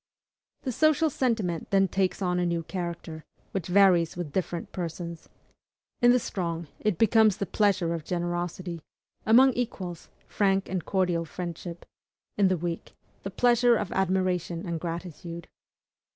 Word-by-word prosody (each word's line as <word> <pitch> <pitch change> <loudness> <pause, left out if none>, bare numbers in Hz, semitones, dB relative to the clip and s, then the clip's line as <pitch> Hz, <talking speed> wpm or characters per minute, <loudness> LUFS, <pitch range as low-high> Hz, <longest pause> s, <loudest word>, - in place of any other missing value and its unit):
The 260 - -2
social 310 +4 +3
sentiment 220 -11 -1
then 195 -1 +4
takes 190 +1 0
on 180 -1 +1
a 175 - +1
new 170 -1 -1
character, 170 -3 -5 0.3
which 190 -4 -3
varies 180 -3 +4
with 165 -5 -5
different 175 -2 -3
persons. 170 -1 -6 0.7
In 240 - +6
the 250 - +5
strong, 170 -7 -3
it 210 -5 0
becomes 220 -2 +4
the 200 - -2
pleasure 190 -3 +1
of 165 -2 -4
generosity; 175 0 -3 0.5
among 255 +4 +7
equals, 190 -8 -4 0.2
frank 195 -1 +1
and 185 -3 -2
cordial 180 -3 0
friendship; 170 +1 -7 0.5
in 200 -2 +4
the 185 -1 +1
weak, 170 0 -5 0.3
the 195 - -5
pleasure 240 +3 +4
of 200 - -3
admiration 185 -2 0
and 170 -1 -2
gratitude. 170 0 -6
180 Hz, 140 wpm, -27 LUFS, 170-200 Hz, 0.7 s, among